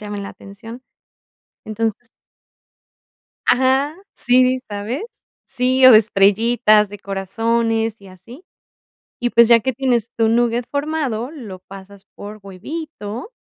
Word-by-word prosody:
llamen 205 -1 -6
la 200 - -7
atención. 225 +5 -12 0.9
Entonces. 225 +2 -4 1.4
Ajá, 265 +4 +2 0.2
sí, 255 +1 +2
¿sabes? 210 - -5 0.4
Sí, 260 0 +1
o 255 - +10
de 215 - +9
estrellitas, 215 +1 +2
de 205 0 -10
corazones, 225 +3 -1
y 195 - -14
así. 210 - -15 0.8
Y, 245 - -1
pues, 235 -1 +5
ya 235 -1 +6
que 260 +3 -2
tienes 240 -3 -1
tu 225 -1 +2
nugget 235 +1 +1
formado, 285 -5 -3
lo 220 - -10
pasas 195 +1 -14
por 210 +1 -10
huevito. 225 - -8
230 Hz, 120 wpm, -19 LUFS, 205-255 Hz, 1.4 s, o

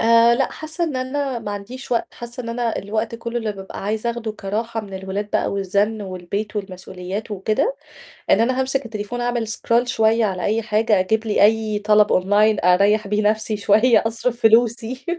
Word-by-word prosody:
آآ، 230 +1 +5
لأ، 270 +2 0
حاسة 315 +2 -4
إن 305 -5 -3
أنا 260 0 -2
ما 210 -3 -6
عنديش 240 +7 -7
وقت، 235 - -1
حاسة 240 +1 -8
إن 230 - -7
أنا 235 -1 -2
الوقت 220 +3 -3
كُلّه 235 +1 -4
اللي 220 -2 -2
بابقى 195 -1 -8
عايزة 215 +3 -1
أخدُه 230 -2 -4
كراحة 220 +3 -3
من 195 -2 -10
الولاد 195 +2 -4
بقى - - 0
والزَنّ 200 +2 0
والبيت 195 +3 -5
والمسؤوليات 190 +1 -6
وكده، 215 - 0 0.5
إن - - +5
أنا 255 +3 +1
هامسك 265 0 -1
التليفون 225 +2 -5
أعمل 240 -2 -1
scroll 230 +2 +1
شوية 225 -1 +2
على 185 -3 -2
أي 220 +2 +1
حاجة، 215 -1 +2
أجيب 220 +4 0
لي 210 -1 +2
أي 215 -1 +2
طَلَب 210 0 +4
online 205 +1 +3
أريّح 200 +4 +4
بيه 210 +1 0
نفسي 215 0 -1
شوية، 215 +4 +4
أصرِف 235 +1 -3
فلوسي. 230 +2 +2
220 Hz, 180 wpm, -21 LUFS, 205-235 Hz, 0.5 s, آآ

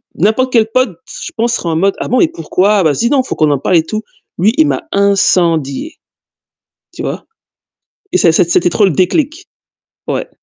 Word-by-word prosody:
N'importe 220 +8 +1
quel 225 -2 +3
pote, 255 -8 0
je - - -8
pense, 230 +1 0
serait 175 - -3
en 160 - -1
mode: 195 +4 +1
«Ah - - -3
bon 255 - +2
et 345 - +4
pourquoi? 190 +5 +1
Vas-y, 160 - +1
non, 275 -1 +3
faut - - -5
qu'on 155 -2 +2
en 140 - 0
parle 180 - 0
et 160 - +2
tout». 215 +6 -5 0.3
Lui, 210 +6 +2
il 315 -1 +4
m'a - - -2
incendié, 180 - +1 1.0
tu - - -7
vois? - - -5 0.9
Et - - +2
c'est 175 - +4
c'est 165 +1 +2
c'était 175 0 +2
trop 205 - +2
le 195 - +3
déclic, 290 - -1 0.6
ouais. - - -2
200 Hz, 195 wpm, -14 LUFS, 170-240 Hz, 1.0 s, et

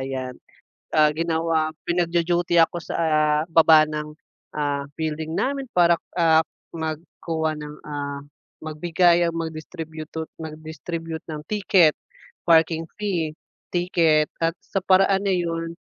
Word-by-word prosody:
ayan. 130 -1 -4 0.6
Ah, 155 -1 +5
ginawa 165 -1 0 0.2
pinagdu-duty 175 0 +1
ako 165 +1 +3
sa, - - -5
ah, 155 -2 +2
baba 160 -1 +7
ng, 150 0 -5 0.4
ah, 145 -1 -1
building 160 0 -3
namin 275 +4 -1
para, 170 -1 +5 0.2
ah, 165 -2 +5 0.4
magkuha 160 0 -3
ng, 150 0 -8
ah, 145 -1 -4 0.4
magbigay 170 +2 +2
o - - -6
magdistributut 160 -1 -6
mag-distribute 160 +1 -6
ng 150 - -5
ticket, 195 -6 +3 0.5
parking 165 0 +4 0.2
fee 180 -7 -1 0.4
ticket. 165 -4 +2 0.2
At 165 +1 +1
sa 195 - -2
paraan 195 +1 +4
na 195 - +2
'yon, 165 -1 -2
160 Hz, 115 wpm, -23 LUFS, 155-170 Hz, 0.6 s, baba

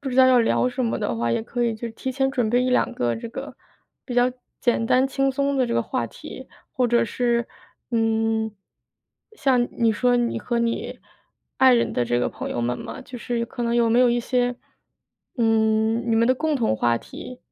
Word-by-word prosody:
不 280 - -4
知 255 - -3
道 260 - +7
要 255 - +5
聊 235 +2 +2
什 250 0 -2
么 225 - 0
的 205 - -2
话， 115 0 0
也 170 - 0
可 240 +1 -2
以 230 -1 0
就 235 +2 -5
提 260 +3 -5
前 270 0 +1
准 245 -5 0
备 245 +2 +2
1-2 255 0 +1
个 120 -1 -1
这 170 - -7
个 - - -8 0.5
比 250 - -6
较 245 +1 +3 0.3
简 235 -2 +1
单 255 +3 +3
轻 270 0 +1
松 280 +1 0
的 255 -2 +2
这 235 - -2
个 - - +2
话 - - -2
题。 - - -11 0.2
或 250 -2 +1
者 235 0 +3
是， 235 +1 0 0.4
嗯， 225 -1 +1 0.8
像 255 - +1
你 230 -2 +2
说 245 +3 +2
你 240 -1 0
和 240 -1 -2
你 235 0 -2 0.6
爱 260 -1 +7
人 235 - +1
的 120 - 0
这 120 +1 +1
个 - - +1
朋 - - -6
友 - - -3
们 120 +1 -1
嘛， - - -7
就 250 -1 -9
是 235 -1 -2
可 240 - -6
能 235 0 0
有 230 -1 +3
没 235 - +4
有 250 - +5
一 240 - +1
些， 245 0 0 0.8
嗯， 225 0 +2
你 225 - +3
们 230 - +3
的 255 - +4
共 310 +1 0
同 225 - +1
话 120 +1 +2
题， - - -10
240 Hz, 230 characters per minute, -23 LUFS, 225-250 Hz, 0.8 s, 道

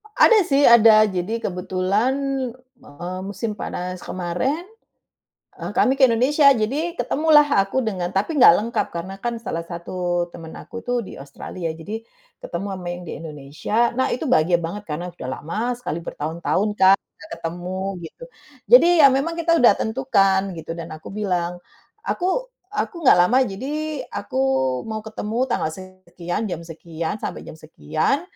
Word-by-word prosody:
Ada 445 +1 +6
sih 275 0 +3
ada 220 -2 +7
jadi 195 +4 -2
kebetulan, 190 +6 0 0.7
eee, 175 - -7
musim 205 +2 -4
panas 180 -1 -5
kemarin, 185 - -2 1.0
eee, - - -4
kami 260 - +4
ke 270 - +5
Indonesia 280 +5 +4
jadi 280 +11 -1
ketemulah 305 0 +4 0.2
aku 195 +7 -1
dengan 185 -5 -2
tapi 255 +12 0
nggak 170 - +9
lengkap 230 +3 -1
karena 175 +3 -5
kan 235 +1 -2
salah 170 -7 -4
satu 175 0 -3
temen 160 -1 -10
aku 235 0 -9
tuh 245 0 0
di - - -10
Australia 155 +5 -6
ya, - - -2
jadi 190 +7 -7 0.5
ketemu 175 +3 -4
ama 185 -2 -8
yang 175 0 -6
di - - -5
Indonesia 160 +10 -2
nah 260 +1 +1
itu 255 - -4
bahagia 175 -5 +4
banget 170 +5 -5
karena 165 +4 -4
sudah 130 - -7
lama 165 +7 -5 0.2
sekali 245 -9 -4
bertahun-tahun 170 +8 -2
kan 190 +1 +7 0.2
nggak - - -14
ketemu 175 +3 -5 0.3
gitu. 325 - -16 0.5
Jadi - - +9 0.2
ya - - +10
memang 275 +6 0
kita 335 0 +2
udah 235 -4 +6
tentukan 195 -6 +1
gitu 165 -1 -9
dan 165 - -5
aku 155 - -10
bilang, 180 -4 -2 0.5
"Aku 380 +7 -1 0.2
aku 425 -1 -3
nggak 250 - +6
lama 255 +6 +4
jadi 285 +7 -4
aku 130 - -4 0.5
mau 220 -1 -4
ketemu 220 0 -5
tanggal 160 - 0
sekian, 185 0 -6
jam 175 -5 -4
sekian, 165 +2 -5
sampai - - -5
jam - - -10
sekian, 160 - -1
195 Hz, 155 wpm, -22 LUFS, 175-245 Hz, 1.0 s, ya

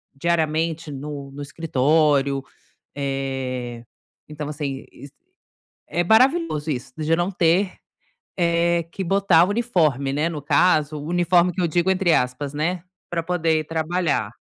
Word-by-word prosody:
diariamente 160 0 0
no 140 0 -7
no 145 - -9
escritório. 145 -2 +1 0.5
Eh, 130 -3 -3 0.4
então 150 -1 -6
assim 140 -3 -4
is 140 - -12 0.8
é 175 - 0
maravilhoso 225 - +3
isso, 125 -2 -4
de 155 +1 +1
não 175 +3 0
ter, 180 +2 +2 0.6
eh, 170 -1 +2
que 195 - -4
botar 190 -2 +4
o 185 - -2
uniforme, 160 - +1
né. 150 +4 0
No 155 -3 -5
caso, 155 -1 +2
o 145 - -7
"uniforme" 175 0 +3
que 185 - -4
eu - - +3
digo 175 +3 +1
entre 185 -3 +2
aspas, 125 +3 -1
né, 165 +4 -1 0.3
pra 170 -1 -1
poder 165 -2 +1
ir 155 - -5
trabalhar. 160 - -1
160 Hz, 140 wpm, -22 LUFS, 140-175 Hz, 0.8 s, botar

